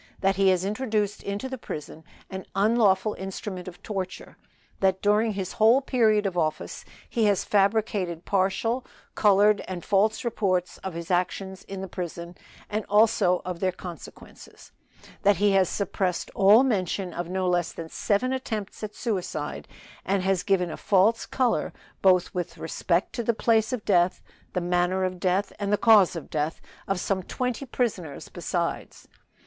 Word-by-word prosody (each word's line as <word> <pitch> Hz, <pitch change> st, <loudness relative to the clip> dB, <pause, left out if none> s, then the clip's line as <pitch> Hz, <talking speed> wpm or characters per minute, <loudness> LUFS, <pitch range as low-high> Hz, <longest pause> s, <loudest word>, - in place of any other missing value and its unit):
That 195 Hz, 0 st, +2 dB
he 195 Hz, +1 st, +3 dB
has 185 Hz, 0 st, +2 dB
introduced 210 Hz, -1 st, -1 dB
into 200 Hz, +6 st, -4 dB
the 260 Hz, -1 st, -6 dB
prison 155 Hz, -4 st, -7 dB, 0.3 s
an 190 Hz, 0 st, -6 dB
unlawful 210 Hz, -1 st, +3 dB
instrument 190 Hz, -1 st, -6 dB
of 180 Hz, -1 st, -10 dB
torture. 190 Hz, -3 st, -5 dB, 0.4 s
That 190 Hz, -1 st, +2 dB
during 210 Hz, +2 st, +2 dB
his 190 Hz, -2 st, -4 dB
whole 225 Hz, +4 st, +5 dB
period 225 Hz, -6 st, +2 dB
of 190 Hz, -2 st, -1 dB
office 155 Hz, -3 st, -2 dB, 0.2 s
he 230 Hz, -2 st, 0 dB
has 205 Hz, -2 st, +2 dB
fabricated 200 Hz, -4 st, +1 dB
partial, 200 Hz, +6 st, 0 dB, 0.3 s
colored 205 Hz, 0 st, +4 dB
and 180 Hz, -3 st, -6 dB
false 210 Hz, +4 st, +2 dB
reports 185 Hz, -6 st, -1 dB
of 190 Hz, -3 st, -6 dB
his 170 Hz, +2 st, -5 dB
actions 190 Hz, +2 st, -1 dB
in 195 Hz, -1 st, -6 dB
the 190 Hz, -, -5 dB
prison, 175 Hz, -1 st, -6 dB, 0.3 s
and 215 Hz, +1 st, -2 dB
also 205 Hz, -4 st, +3 dB
of 180 Hz, -2 st, -4 dB
their 185 Hz, 0 st, +1 dB
consequences; 180 Hz, -1 st, -11 dB, 0.5 s
that 205 Hz, 0 st, +4 dB
he 205 Hz, +3 st, +3 dB
has 190 Hz, -2 st, +3 dB
suppressed 190 Hz, -2 st, -2 dB
all 205 Hz, +6 st, +6 dB
mention 190 Hz, -6 st, -1 dB
of 175 Hz, 0 st, -4 dB
no 185 Hz, 0 st, -1 dB
less 175 Hz, -1 st, +1 dB
than 165 Hz, -, -7 dB
seven 215 Hz, +9 st, 0 dB
attempts 220 Hz, -6 st, -4 dB
at 215 Hz, -1 st, -6 dB
suicide, 180 Hz, -9 st, -3 dB, 0.4 s
and 195 Hz, -1 st, 0 dB
has 190 Hz, -1 st, +1 dB
given 185 Hz, -4 st, +1 dB
a -, -, -6 dB
false 205 Hz, +4 st, +2 dB
color, 255 Hz, -2 st, 0 dB, 0.3 s
both 185 Hz, -2 st, +4 dB
with 175 Hz, -1 st, -4 dB
respect 170 Hz, +2 st, -1 dB
to -, -, -2 dB
the 230 Hz, 0 st, +1 dB
place 220 Hz, -1 st, +2 dB
of 250 Hz, -5 st, -4 dB
death, 180 Hz, -2 st, +3 dB, 0.3 s
the 180 Hz, -, 0 dB
manner 180 Hz, +2 st, +1 dB
of 185 Hz, -1 st, -2 dB
death 190 Hz, +3 st, 0 dB
and 200 Hz, -1 st, -2 dB
the 205 Hz, -, +4 dB
cause 210 Hz, -6 st, +5 dB
of 165 Hz, -, -7 dB
death 155 Hz, +1 st, -1 dB, 0.3 s
of 195 Hz, -2 st, 0 dB
some 190 Hz, +1 st, -1 dB
twenty 250 Hz, +7 st, -3 dB
prisoners 195 Hz, -, -3 dB
besides. -, -, -4 dB
195 Hz, 165 wpm, -26 LUFS, 180-215 Hz, 0.5 s, all